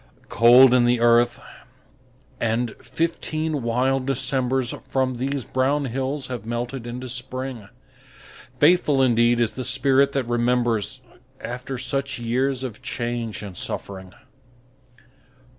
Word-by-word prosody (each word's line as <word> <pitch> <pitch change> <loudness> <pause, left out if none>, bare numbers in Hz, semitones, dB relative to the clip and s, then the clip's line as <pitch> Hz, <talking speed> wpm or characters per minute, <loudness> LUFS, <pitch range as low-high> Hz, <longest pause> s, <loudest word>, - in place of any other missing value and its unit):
Cold 120 +3 +7
in 125 -1 +4
the 120 0 +2
earth, 120 0 +3 1.0
and 115 +1 0
fifteen 160 -2 -2
wild 130 +3 0
Decembers 130 -1 0
From 130 -2 -1
these 135 +1 -3
brown 140 +3 0
hills 135 +3 -2
have 125 -4 -5
melted 120 +2 -4
into 125 +2 -6
Spring. 125 -3 -4 0.9
Faithful 150 -4 +4
indeed 120 -1 +3
is 115 -2 +1
the 130 - -5
spirit 135 +2 +3
that 135 - 0
remembers 120 0 0 0.4
After 125 +2 -6
such 135 +2 -3
years 130 +3 -1
of 120 -5 -6
change 120 -3 -4
and 100 -3 -8
suffering! 95 0 -5
125 Hz, 115 wpm, -23 LUFS, 120-135 Hz, 1.0 s, Cold